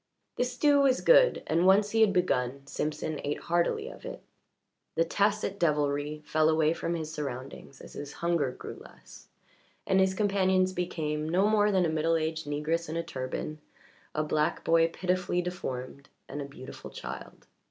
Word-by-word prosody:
The -, -, +2 dB
stew 285 Hz, +3 st, +3 dB
was 265 Hz, -2 st, +3 dB
good, -, -, +5 dB
and 170 Hz, +3 st, +2 dB
once 205 Hz, +2 st, +5 dB
he 225 Hz, -, +2 dB
had 215 Hz, -2 st, +6 dB
begun 140 Hz, -8 st, 0 dB
Simpson 150 Hz, +2 st, -3 dB
ate 145 Hz, +1 st, -2 dB
heartily 170 Hz, 0 st, 0 dB
of -, -, -10 dB
it. -, -, -8 dB, 0.7 s
The 165 Hz, -, +3 dB
tacit 200 Hz, +2 st, 0 dB
devilry 150 Hz, -1 st, 0 dB
fell 155 Hz, 0 st, +3 dB
away 160 Hz, 0 st, +3 dB
from 170 Hz, 0 st, -2 dB
his 160 Hz, -1 st, -5 dB
surroundings 135 Hz, -1 st, -6 dB
as -, -, -12 dB
his 145 Hz, 0 st, -7 dB
hunger 170 Hz, -5 st, 0 dB
grew -, -, -9 dB
less, -, -, -15 dB, 0.6 s
and 190 Hz, -, +3 dB
his 190 Hz, 0 st, +3 dB
companions 190 Hz, -2 st, +2 dB
became 155 Hz, -4 st, -2 dB
no 185 Hz, +5 st, +3 dB
more 210 Hz, -1 st, +3 dB
than 185 Hz, -3 st, +3 dB
a -, -, +1 dB
middle 160 Hz, +1 st, +1 dB
aged 160 Hz, -1 st, -2 dB
negress 155 Hz, +3 st, -1 dB
in 160 Hz, -, -3 dB
a 170 Hz, -, -1 dB
turban, 145 Hz, +1 st, -5 dB, 0.6 s
a 155 Hz, -, +1 dB
black 150 Hz, 0 st, 0 dB
boy 165 Hz, 0 st, +4 dB
pitifully 180 Hz, +1 st, -1 dB
deformed, 140 Hz, -7 st, -5 dB, 0.2 s
and 145 Hz, -, -5 dB
a -, -, -4 dB
beautiful 140 Hz, -2 st, -10 dB
child. -, -, -8 dB
165 Hz, 170 wpm, -29 LUFS, 150-185 Hz, 0.7 s, had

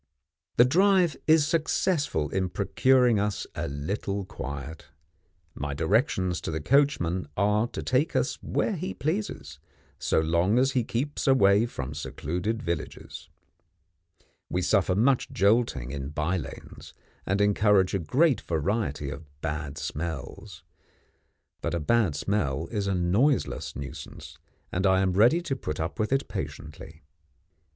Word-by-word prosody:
The 120 Hz, -, +8 dB
drive 180 Hz, +2 st, +3 dB
is 155 Hz, -1 st, +5 dB
successful 155 Hz, -, 0 dB
in 95 Hz, -1 st, 0 dB
procuring 125 Hz, +4 st, +3 dB
us 105 Hz, 0 st, -1 dB
a -, -, -3 dB
little 95 Hz, +7 st, -3 dB
quiet. 70 Hz, -4 st, -7 dB, 0.7 s
My 70 Hz, 0 st, -4 dB
directions 95 Hz, -, +1 dB
to -, -, -4 dB
the 80 Hz, 0 st, -2 dB
coachman 95 Hz, -, +2 dB
are 105 Hz, +3 st, +2 dB
to -, -, -6 dB
take 135 Hz, +6 st, +1 dB
us -, -, 0 dB
where 215 Hz, -, -1 dB
he 180 Hz, +2 st, -4 dB
pleases, 150 Hz, -, -3 dB, 0.4 s
so -, -, +1 dB
long 85 Hz, +7 st, +2 dB
as 135 Hz, +2 st, +3 dB
he 130 Hz, -3 st, +1 dB
keeps 140 Hz, +7 st, -3 dB
away 110 Hz, -4 st, +5 dB
from 70 Hz, -, -6 dB
secluded 90 Hz, +9 st, -3 dB
villages. 85 Hz, -3 st, -5 dB, 1.2 s
We 90 Hz, +1 st, -1 dB
suffer 95 Hz, -2 st, +2 dB
much 125 Hz, +5 st, +2 dB
jolting 100 Hz, -, +1 dB
in 70 Hz, -1 st, -5 dB
by 75 Hz, +5 st, -1 dB
lanes, 80 Hz, -7 st, -8 dB, 0.3 s
and 100 Hz, +1 st, +1 dB
encounter 105 Hz, 0 st, +4 dB
a -, -, +1 dB
great 135 Hz, -, +2 dB
variety 80 Hz, -4 st, -2 dB
of 75 Hz, +1 st, -9 dB
bad 75 Hz, -2 st, -4 dB
smells. 80 Hz, -3 st, -6 dB, 1.0 s
But 85 Hz, 0 st, -2 dB
a -, -, 0 dB
bad 95 Hz, 0 st, +2 dB
smell 80 Hz, -3 st, -1 dB
is 105 Hz, -3 st, -2 dB
a 100 Hz, -, +1 dB
noiseless 100 Hz, +11 st, +1 dB
nuisance, 70 Hz, -1 st, -9 dB, 0.3 s
and 95 Hz, +2 st, +1 dB
I 95 Hz, 0 st, +4 dB
am 95 Hz, -1 st, +1 dB
ready 120 Hz, -, +4 dB
to 160 Hz, -6 st, -2 dB
put 75 Hz, -, -5 dB
up 80 Hz, +1 st, -3 dB
with 110 Hz, +2 st, 0 dB
it 135 Hz, 0 st, +1 dB
patiently. 75 Hz, +1 st, -7 dB
100 Hz, 140 wpm, -27 LUFS, 80-125 Hz, 1.2 s, The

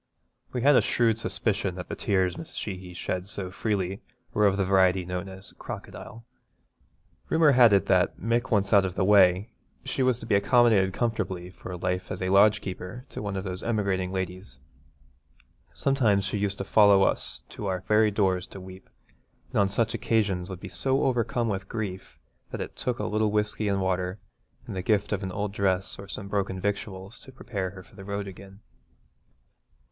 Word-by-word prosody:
We 125 Hz, -2 st, -3 dB
had 145 Hz, +1 st, +6 dB
a -, -, +6 dB
shrewd 115 Hz, -2 st, +1 dB
suspicion 100 Hz, -5 st, -1 dB
that 90 Hz, -1 st, -7 dB
the -, -, -5 dB
tears 95 Hz, -3 st, 0 dB
Mrs. 165 Hz, 0 st, -9 dB
Sheehy 90 Hz, -3 st, -6 dB
shed 90 Hz, +1 st, -3 dB
so 95 Hz, -2 st, -4 dB
freely 100 Hz, -2 st, -2 dB, 0.3 s
were 105 Hz, -1 st, +4 dB
of 95 Hz, 0 st, +1 dB
the 95 Hz, -, +1 dB
variety 95 Hz, -1 st, +3 dB
known 90 Hz, +2 st, -4 dB
as 95 Hz, 0 st, -10 dB
crocodile. 115 Hz, 0 st, -9 dB, 1.0 s
Rumour 160 Hz, -2 st, +5 dB
had 125 Hz, -4 st, +7 dB
it 100 Hz, -1 st, +4 dB
that 90 Hz, 0 st, +2 dB
Mick 120 Hz, +2 st, 0 dB
once 100 Hz, -3 st, +1 dB
out 100 Hz, -2 st, +7 dB
of 95 Hz, -1 st, -3 dB
the 95 Hz, -, +1 dB
way 95 Hz, +1 st, +4 dB, 0.3 s
she -, -, -2 dB
was 130 Hz, -2 st, +3 dB
to 115 Hz, -, -9 dB
be 115 Hz, -, -1 dB
accommodated 100 Hz, -2 st, +4 dB
comfortably 95 Hz, -5 st, -2 dB
for 90 Hz, -1 st, -8 dB
life 90 Hz, +1 st, -2 dB
as 95 Hz, -, -4 dB
a 95 Hz, -, -1 dB
lodgekeeper 100 Hz, +2 st, +2 dB
to -, -, -7 dB
one 100 Hz, -1 st, -4 dB
of 95 Hz, -, -3 dB
those 95 Hz, -1 st, -4 dB
emigrating 100 Hz, -5 st, -1 dB
ladies. 95 Hz, -7 st, -5 dB, 1.1 s
Sometimes 115 Hz, -8 st, +2 dB
she 100 Hz, +1 st, -2 dB
used 100 Hz, -1 st, -1 dB
to -, -, -3 dB
follow 100 Hz, -1 st, +5 dB
us -, -, +3 dB
to 105 Hz, -, -6 dB
our 95 Hz, -1 st, -1 dB
very 105 Hz, +3 st, +3 dB
doors 95 Hz, -3 st, 0 dB
to -, -, -10 dB
weep, 95 Hz, 0 st, -12 dB, 0.6 s
and -, -, 0 dB
on 100 Hz, -1 st, +3 dB
such 115 Hz, +3 st, 0 dB
occasions 100 Hz, -5 st, 0 dB
would 95 Hz, -2 st, -6 dB
be 100 Hz, -, -8 dB
so 130 Hz, +10 st, +1 dB
overcome 120 Hz, -2 st, 0 dB
with 95 Hz, -2 st, -3 dB
grief 100 Hz, -5 st, -5 dB, 0.3 s
that -, -, -6 dB
it -, -, -6 dB
took 125 Hz, -2 st, -2 dB
a 105 Hz, -, -3 dB
little 110 Hz, 0 st, +1 dB
whisky 105 Hz, 0 st, 0 dB
and 100 Hz, -1 st, 0 dB
water 90 Hz, 0 st, -1 dB, 0.5 s
and -, -, -7 dB
the 95 Hz, -, -2 dB
gift 105 Hz, +1 st, +1 dB
of 100 Hz, -, -1 dB
an 95 Hz, -2 st, -4 dB
old 100 Hz, +1 st, -3 dB
dress 95 Hz, -2 st, -1 dB
or 100 Hz, -, -9 dB
some 100 Hz, 0 st, -6 dB
broken 100 Hz, -2 st, -2 dB
victuals 100 Hz, +1 st, -4 dB
to 130 Hz, -, -13 dB
prepare 105 Hz, -7 st, -4 dB
her 95 Hz, 0 st, -11 dB
for -, -, -21 dB
the 95 Hz, -, -10 dB
road 100 Hz, 0 st, -4 dB
again. 95 Hz, +1 st, -12 dB
100 Hz, 190 wpm, -27 LUFS, 95-110 Hz, 1.1 s, had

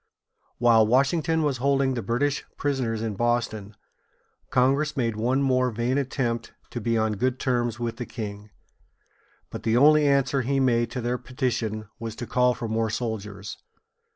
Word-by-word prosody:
While 115 Hz, -2 st, +5 dB
Washington 160 Hz, +6 st, +2 dB
was 145 Hz, -3 st, 0 dB
holding 135 Hz, +1 st, +2 dB
the 120 Hz, -, -2 dB
British 135 Hz, +7 st, 0 dB
prisoners 125 Hz, -6 st, -1 dB
in 110 Hz, -2 st, -2 dB
Boston, 110 Hz, -2 st, -1 dB, 0.7 s
Congress 135 Hz, +4 st, +2 dB
made 115 Hz, -4 st, 0 dB
one 125 Hz, +5 st, +1 dB
more 130 Hz, -1 st, +2 dB
vain 120 Hz, +4 st, 0 dB
attempt 120 Hz, -4 st, -2 dB, 0.2 s
to 120 Hz, -, -4 dB
be 115 Hz, +1 st, +1 dB
on 110 Hz, -1 st, 0 dB
good 130 Hz, +3 st, 0 dB
terms 120 Hz, -3 st, 0 dB
with 115 Hz, -1 st, -3 dB
the 120 Hz, -, -5 dB
king. 105 Hz, -1 st, -7 dB, 1.0 s
But -, -, -6 dB
the 115 Hz, +1 st, +1 dB
only 150 Hz, +2 st, +6 dB
answer 140 Hz, -1 st, +2 dB
he 135 Hz, +3 st, 0 dB
made 120 Hz, -3 st, +2 dB
to 125 Hz, +1 st, -4 dB
their 120 Hz, +1 st, -1 dB
petition 115 Hz, -4 st, -2 dB
was 115 Hz, -1 st, -5 dB
to 120 Hz, -, -5 dB
call 125 Hz, +1 st, +2 dB
for 120 Hz, -2 st, -4 dB
more 110 Hz, 0 st, 0 dB
soldiers. 105 Hz, -3 st, -5 dB
120 Hz, 160 wpm, -25 LUFS, 115-130 Hz, 1.0 s, only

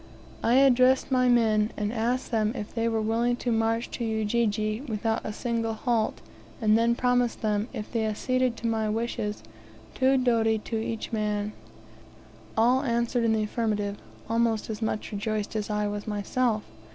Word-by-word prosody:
I 235 Hz, -, +3 dB
addressed 260 Hz, 0 st, +4 dB
my 255 Hz, -1 st, +3 dB
men, 220 Hz, -3 st, +3 dB
and 210 Hz, +1 st, -1 dB
asked 245 Hz, +3 st, -1 dB
them 220 Hz, -1 st, +1 dB
if 210 Hz, -4 st, -6 dB
they 230 Hz, -1 st, 0 dB
were 225 Hz, -1 st, 0 dB
willing 230 Hz, +2 st, +1 dB
to 245 Hz, 0 st, -2 dB
march 225 Hz, +1 st, +1 dB
to 240 Hz, -, -4 dB
Ujiji 220 Hz, 0 st, 0 dB
without 220 Hz, +1 st, -1 dB
a -, -, -4 dB
single 230 Hz, 0 st, -2 dB
halt, 225 Hz, -1 st, 0 dB, 0.4 s
and 215 Hz, -2 st, +4 dB
then 230 Hz, +1 st, +3 dB
promised 245 Hz, -1 st, +1 dB
them, 210 Hz, 0 st, 0 dB
if 210 Hz, -, -6 dB
they 225 Hz, -2 st, +1 dB
acceded 255 Hz, +3 st, 0 dB
to -, -, -7 dB
my 220 Hz, -1 st, 0 dB
wishes, 215 Hz, -, -2 dB, 0.5 s
two 265 Hz, +1 st, +3 dB
doti 225 Hz, -3 st, +2 dB
each 225 Hz, +1 st, -3 dB
man. 210 Hz, -1 st, -1 dB, 1.0 s
All 245 Hz, +4 st, +4 dB
answered 235 Hz, -2 st, 0 dB
in 225 Hz, -1 st, +3 dB
the 220 Hz, -1 st, +1 dB
affirmative, 210 Hz, -2 st, -1 dB, 0.3 s
almost 230 Hz, -1 st, 0 dB
as 215 Hz, +1 st, -6 dB
much 220 Hz, -1 st, -2 dB
rejoiced 210 Hz, +1 st, -3 dB
as 215 Hz, -1 st, -2 dB
I 210 Hz, 0 st, 0 dB
was 205 Hz, +1 st, -4 dB
myself. 215 Hz, +2 st, 0 dB
225 Hz, 165 wpm, -27 LUFS, 215-235 Hz, 1.0 s, addressed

